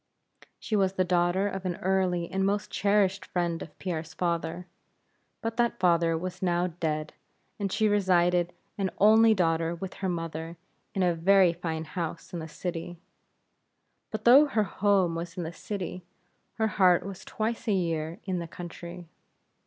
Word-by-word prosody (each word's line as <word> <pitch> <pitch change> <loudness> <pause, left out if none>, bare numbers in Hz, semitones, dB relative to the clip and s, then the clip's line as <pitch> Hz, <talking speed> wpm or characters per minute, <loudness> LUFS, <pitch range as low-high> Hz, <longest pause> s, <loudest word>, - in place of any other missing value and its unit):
She 225 - -3
was 195 -2 +2
the 185 - +1
daughter 180 +2 +2
of 195 -1 -4
an 180 -2 -2
early 185 -2 0
and 190 0 0
most 205 +1 0
cherished 200 -1 +2
friend 170 -2 -2
of 155 - -10
Pierre's 165 -3 -4
father. 170 0 -2 0.8
But 225 0 -3
that 235 -4 +1
father 170 -2 +3
was 185 +2 -5
now 175 -1 +1
dead, 155 -3 -3 0.5
and 200 -2 -2
she 215 +2 +2
resided 180 -4 +3 0.3
an 195 -1 +1
only 220 +2 +6
daughter 165 -2 +1
with 185 +2 -6
her 190 - 0
mother, 165 -1 -4 0.4
in 190 - +2
a 175 -1 +3
very 180 +1 +4
fine 165 -2 -4
house 165 +1 -5
in 175 - -3
the 160 - -6
city. 170 +2 -5 1.1
But - - -5
though 270 +5 +8
her 225 -6 +1
home 195 -2 +2
was 170 +1 -5
in 175 - -2
the 165 +1 -5
city, 185 -1 -5 0.5
her 220 -1 0
heart 185 -4 +4
was 195 -2 -7
twice 225 +2 -3
a - - +3
year 165 -3 -1
in 185 -2 -2
the 170 - -5
country. 175 +1 -9
180 Hz, 165 wpm, -28 LUFS, 170-195 Hz, 1.1 s, though